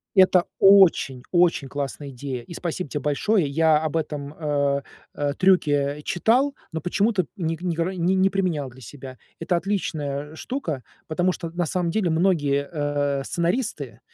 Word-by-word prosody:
Это 185 -2 +5
очень-очень 175 -5 +4
классная 140 +1 -5
идея, 130 -1 -5
и 170 - -11
спасибо 170 -1 -4
тебе 150 - -3
большое. 150 +6 +1
Я 155 +2 +3
об 155 +1 -1
этом, 145 -2 -4
э, 140 -3 0 0.3
э, 145 -1 -1
трюке 145 -6 +2
читал, 250 - +2 0.2
но 160 -1 -4
почему-то 195 +3 +1
не 165 -3 -2
не 180 -2 -1
ког 170 +3 -1
не 185 +2 +2
применял 180 -8 -1
для 130 +1 -16
себя. 130 +1 -10 0.2
Это 170 +2 0
отличная 150 -6 -3
штука, 160 - -4 0.2
потому 180 +3 +1
что 170 -2 -6
на 175 +1 -1
самом 175 +1 -1
деле 195 -2 0
многие, 155 -5 +1
э, 145 -3 -1
сценаристы, 170 - -2
160 Hz, 150 wpm, -24 LUFS, 145-185 Hz, 0.3 s, Это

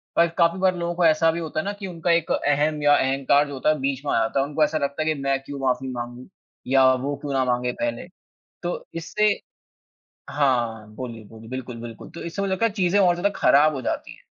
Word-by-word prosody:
पर 170 - +5
काफ़ी 170 +2 +3
बार 185 -1 +3
लोगों 170 0 -2
को 175 - +2
ऐसा 160 0 +4
भी 170 - -4
होता 155 -1 -3
है - - -1
ना 205 - -2
कि 195 - -5
उनका 170 -1 -1
एक 170 -1 +1
अहम 150 +1 +1
या 145 0 +6
अहंकार 135 +2 +2
जो 145 - -7
होता 135 +3 0
है 155 -2 +2
बीच 140 +1 -2
में - - 0
आ - - +3
जाता 115 +4 0
है, 135 - +2
उनको 150 +1 +1
ऐसा 150 +1 +1
लगता 140 +1 -2
है - - -4
कि 140 - -7
मैं 135 0 +1
क्यों 140 0 -7
माफ़ी 130 0 0
माँगू 120 +1 -7 0.4
या 135 0 +5
वो 135 +3 -2
क्यों 145 -2 -4
ना 135 -1 +2
माँगे 125 0 0
पहले? 295 -1 -2 0.6
तो - - -3
इससे 210 +5 +1 1.0
हाँ, 120 -6 0
बोलिए, 115 -2 -7
बोलिए, 110 +1 -13
बिल्कुल, 130 -2 -6
बिल्कुल 115 -2 -9
तो 170 - -9
इससे 170 +4 -4
वो 195 - -1
लगता 190 +4 +1
है 225 - -2
चीज़ें 195 -1 +1
और 180 -3 +4
ज़्यादा 185 +3 +1
ख़राब 150 +2 +5
हो 130 - -4
जाती - - -3
हैं। - - -23
145 Hz, 240 wpm, -24 LUFS, 130-170 Hz, 1.0 s, या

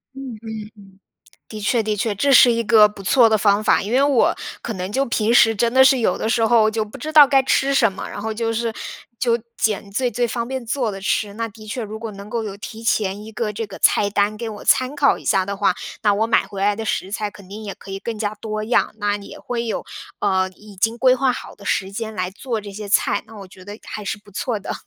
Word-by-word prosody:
嗯 270 -3 -7
嗯 - - -11
嗯， - - -5 1.0
的 215 -1 -8
确 225 +2 +1
的 215 -1 -1
确， 210 +1 -1
这 275 +8 +2
是 250 -1 +8
一 230 0 0
个 215 -1 +6
不 210 -1 -12
错 230 +5 +5
的 220 -1 +2
方 205 0 +3
法， - - +3
因 205 - -5
为 260 +2 +4
我 280 -4 +3 0.3
可 230 - -4
能 185 +1 -4
就 270 +6 +1
平 230 -1 +1
时 225 -2 +6
真 230 +3 +1
的 265 0 +6
是 265 -1 +5
有 185 -5 +1
的 - - -2
时 225 0 +2
候 225 -2 +4
就 220 -1 -1
不 215 +6 -12
知 310 +5 -5
道 300 -2 +9
该 270 -1 +4
吃 270 +1 +2
什 235 -5 +4
么， 190 - -7
然 205 - -7
后 220 +1 -3
就 225 0 -1
是 230 0 -1 0.5
就 235 -2 +2 0.2
捡 205 -2 -1
最 245 +4 0
最 240 +2 0
方 235 0 -3
便 265 -2 -4
做 245 -1 -1
的 195 -1 -7
吃。 200 +1 -1
那 230 +1 -3
的 215 0 -14
确 230 +3 -4
如 215 +1 -6
果 225 -1 -6
能 200 +1 -10
够 230 +1 -2
有 200 -2 -6
提 220 +2 -9
前 205 -2 0
一 220 - -9
个 220 -2 -2
这 220 +2 -4
个 - - -10
菜 205 -1 +3
单 205 +1 +1
给 230 +1 -5
我 210 -1 -8
参 260 +3 +3
考 280 -1 +3
一 - - -14
下 190 0 +2
的 200 0 -3
话， 195 -2 +2 0.3
那 210 -2 +4
我 220 +2 +1
买 230 - +2
回 195 -1 -7
来 205 +1 +2
的 225 - -4
食 195 -2 -2
材 210 -1 -2
肯 185 0 -15
定 210 +2 -8
也 200 - -5
可 195 - -13
以 195 - -4
更 225 +1 -5
加 210 -1 -2
多 215 0 -5
样， 230 +3 +1
那 205 -1 0
也 200 -1 -11
会 235 -1 -3
有 225 - -3 0.4
呃 185 0 +1
已 205 +2 -16
经 225 +5 0
规 255 -1 +5
划 260 0 +1
好 - - -8
的 200 - -15
时 195 -1 -1
间 220 +1 -5
来 185 -2 -2
做 225 +2 -4
这 205 0 -9
些 210 0 -7
菜， 200 - +2
那 220 0 -13
我 195 - -9
觉 185 0 -15
得 205 +2 -9
还 210 - -7
是 205 - -3
不 205 0 -20
错 220 +3 -2
的。 200 - -5
220 Hz, 290 characters per minute, -21 LUFS, 205-235 Hz, 1.0 s, 道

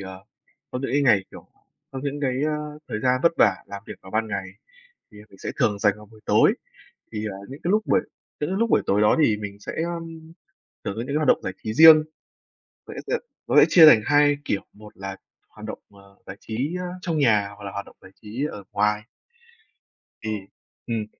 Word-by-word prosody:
ờ, 95 0 -9 0.5
có 125 - -3
những - - -2
cái 145 0 +2
ngày, 105 -8 +4
kiểu, - - -13 0.4
có 135 - -6
những 145 0 -3
cái, 130 0 -1
ơ, 150 0 -3
thời 105 - -3
gian 130 +1 +2
vất 170 - +4
vả - - +5
làm 100 0 -8
việc - - -7
vào 95 - -12
ban 110 0 -1
ngày, 100 -2 -3 0.7
thì 105 - -15
mình 95 - -17
sẽ - - -5
thường 105 -2 +1
dành 105 0 +3
vào 105 0 -14
buổi 110 0 -19
tối, - - +4 0.6
thì, 110 -1 -3
ờ, 95 - -7
những 140 +3 -9
cái 175 - -1
lúc 215 +1 +3
buổi - - +3 0.4
những 150 - -2
cái 190 - -1
lúc 230 0 +1
buổi - - +4
tối 100 +1 +2
đó 105 - +4
thì 105 - +2
mình 100 -1 -7
sẽ, - - -6
ờm, 165 -1 -7 0.5
thường 100 - -3
có 110 - -5
những 120 - -4
cái 140 - -2
hoạt 150 -3 0
động - - +4
giải 95 - -3
trí 110 - -3
riêng. 160 0 +9 0.8
Vậy - - -9
á, - - -6
ờ, - - -6 0.3
nó - - +1
sẽ - - +8
chia 165 -3 +8
thành 150 -8 +8
hai 145 0 +4
kiểu, 100 - -1
một 105 0 -15
là 95 0 -6 0.3
hoạt - - -13
động, - - -6
ờ, 100 -1 -19
giải 95 - -8
trí, 130 +10 -3 0.2
trong 170 -3 -2
nhà, 110 -8 +3
hoặc 100 - -12
là 100 - -6
hoạt 100 0 -5
động - - -17
giải 95 - -15
trí 115 +7 -4
ở 100 - -9
ngoài 105 +1 +1 1.2
ừm, 110 - -1 0.5
ừm. 115 -2 -2
110 Hz, 225 wpm, -24 LUFS, 100-150 Hz, 1.2 s, riêng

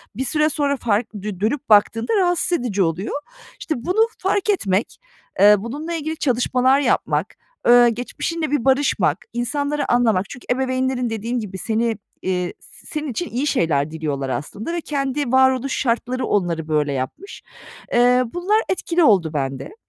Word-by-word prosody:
bir 265 +4 -2
süre 300 +4 +2
sonra 285 -2 0
fark, 225 -1 -1
dö 205 -2 -6
dönüp 235 +6 -1
baktığında 220 - +3
rahatsız 355 -2 +1
edici 205 -6 0
oluyor. 170 +5 -2 0.5
İşte, 320 -10 -2
bunu 435 +6 +3
fark 395 +2 -1
etmek, 205 - 0 0.4
eee, 205 +2 +8
bununla 290 +11 -5
ilgili 315 -1 -3
çalışmalar 255 0 +2
yapmak, 285 - 0 0.3
eee, 240 0 +7
geçmişinle 290 +7 -3
bir 290 -5 0
barışmak, 270 +2 +2 0.2
insanları 285 +4 -1
anlamak, 220 -6 +2
çünkü 245 - -10
ebeveynlerin 255 -1 0
dediğim 230 +3 -2
gibi 200 -4 -6
seni, 225 +1 -1 0.2
eee, 180 -1 -2 0.2
senin 305 -1 -6
için 350 +9 -4
iyi 265 +5 -2
şeyler 155 - +1
diliyorlar 145 -4 -3
aslında 205 - -4
ve 345 - -2
kendi 275 -3 -2
varoluş 260 0 +3
şartları 250 +1 -1
onları 170 -5 -1
böyle 150 -2 0
yapmış. 135 - -6 0.5
Eee, 245 +1 +4
bunlar 405 +5 +1
etkili 350 -2 +1
oldu 190 - +4
bende. 135 - -4
245 Hz, 150 wpm, -21 LUFS, 205-290 Hz, 0.5 s, eee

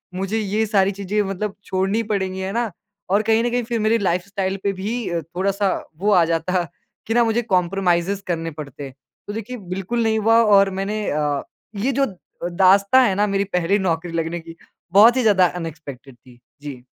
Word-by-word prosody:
मुझे 195 +4 -2
ये 215 +1 0
सारी 200 -2 +2
चीज़ें 200 +1 -2
मतलब 195 +1 -4
छोड़नी 195 +4 0
पड़ेंगी, 190 -3 -2
है 190 0 -3
ना? 235 -2 -1 0.4
और 200 +3 +3
कहीं 225 +1 +2
न 240 - +1
कहीं 245 0 0
फिर 235 0 -2
मेरी 220 +2 +2
लाइफ़स्टाइल 190 0 -1
पे 200 - 0
भी 195 -2 -3
थोड़ा-सा 195 +5 -1 0.3
वो 205 +3 +1
आ 180 -4 +5
जाता 170 +2 0 0.4
कि 225 - 0
ना 240 +1 +4
मुझे 230 +1 +1
कोम्प्रोमाइज़ेज़ 190 -2 0
करने 165 -2 -2
पड़ते। 145 -2 -8 0.4
तो 205 - -5
देखिए 225 +3 -6 0.2
बिल्कुल 210 +5 -2
नहीं 220 -1 +1
हुआ 225 +2 +4
और 200 -2 +5
मैंने 205 +2 -2
अ, 145 -1 0 0.3
ये 220 +7 0
जो 275 +1 +2
अ, 195 - -8 0.3
दास्ताँ 195 +7 +5
है 195 - 0
ना 205 +2 +2
मेरी 195 0 0
पहली 180 +3 +2
नौकरी 175 -2 -1
लगने 165 +1 -2
की, 165 0 -12 0.4
बहुत 225 +6 +7
ही - - +3
ज़्यादा 205 -5 +4
अनएक्सपेक्टेड 150 -7 -8
थी। 120 0 -20 0.2
जी। 140 -4 -8
195 Hz, 185 wpm, -21 LUFS, 175-215 Hz, 0.4 s, बहुत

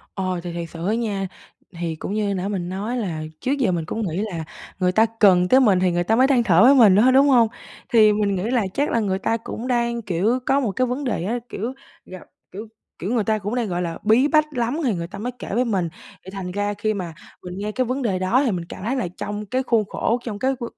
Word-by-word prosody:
Ờ, 185 -2 -2
thì 175 0 -6
thiệt 170 -1 -5
sự 170 +1 -6
á 215 - +2
nha, 210 -4 -2 0.5
thì 165 -2 -3
cũng 195 - -5
như 205 -2 0
nãy 185 +1 -2
mình 185 -4 -3
nói 205 +7 -3
là 175 -10 -3 0.2
trước 260 - -1
giờ 230 -9 +2
mình 165 -2 -1
cũng 225 - -4
nghĩ 160 - -4 0.2
là 165 -2 -4 0.4
người 180 0 +2
ta 220 +4 +4
cần 180 -3 +5
tới 260 +5 +6
mình 205 -8 +4
thì 185 -1 +2
người 175 0 0
ta 220 +5 +2
mới 260 +2 +5
than 265 -3 +3
thở 185 -3 +4
với 265 +3 +7
mình 220 -8 +6
thôi, 250 +5 +5
đúng 275 +2 +5
hông? 240 -4 +5 0.4
Thì 215 -3 +6
mình 205 -1 0
nghĩ 180 - -2
là 245 -3 +2
chắc 285 +2 0
là 230 - +1
người 190 -3 -1
ta 225 - 0
cũng 230 +1 -7
đang, 235 -1 0
kiểu, 205 +5 0
có 275 +1 +3
một 240 -6 -1
cái 255 +6 0
vấn 250 +4 -3
đề 220 -9 -2
á, 230 +6 -1
kiểu, 230 +6 -4 0.3
gặp 185 -1 -10 0.3
kiểu 210 +4 -8 0.3
kiểu, 185 - -4
người 225 -4 +1
ta 215 0 +1
cũng 205 +2 -4
đang, 240 -3 -1
gọi 175 -1 -2
là, 170 -1 -4
bí 230 +7 +4
bách 305 0 +4
lắm 245 +2 -1
thì 235 - +1
người 170 -1 -4
ta 195 - -9
mới 245 +5 -4
kể - - -7
với 245 +3 +2
mình. 195 -7 0 0.4
Thì 190 - -9
thành 190 -2 -6
ra 205 +1 -1
khi 215 +1 -1
mà 175 -5 -5 0.3
mình 180 0 -7
nghe 210 +1 -3
cái 255 +3 0
vấn 255 +3 -2
đề 200 -6 0
đó 190 +9 +2
thì 255 - +1
mình 175 -4 -3
cảm 185 - -8
thấy 255 +5 -1
là 240 -9 -1
trong 205 +1 -5
cái 255 +6 -1
khuôn 230 -4 +1
khổ, 235 - 0
trong 215 -4 -5
cái 265 +4 +1
v - - -3
210 Hz, 275 wpm, -22 LUFS, 185-240 Hz, 0.5 s, với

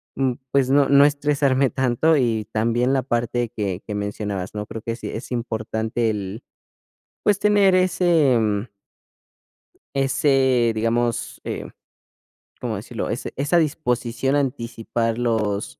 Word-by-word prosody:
mm 130 -2 +1 0.2
pues, 135 -2 +2
no 140 0 +4
no 140 0 +6
estresarme 140 -2 +2
tanto, 130 +5 +2
y 115 -6 +1
también 120 +4 +1
la 135 - +2
parte 120 -1 -1
que 100 -3 -3
que 105 - -4
mencionabas, 100 -2 -4
¿no? 105 0 -5
Creo 115 - -7
que 115 0 -3
sí - - -7
es 115 +3 -7
importante 110 -1 -1
el, 105 +2 -5 0.8
pues, 205 -1 +2
tener 205 -2 +4
ese, 175 -7 +3
mm. 105 -1 0 1.3
Ese, 135 -3 +2
digamos, 115 +1 -1
eh, - - -5 0.9
¿cómo - - -2
decirlo? - - -5
Ese - - -4
esa 145 +6 +1
disposición 135 -4 0
a - - +4
anticipar 115 -3 -2
los 110 -4 -1
120 Hz, 135 wpm, -22 LUFS, 110-140 Hz, 1.3 s, no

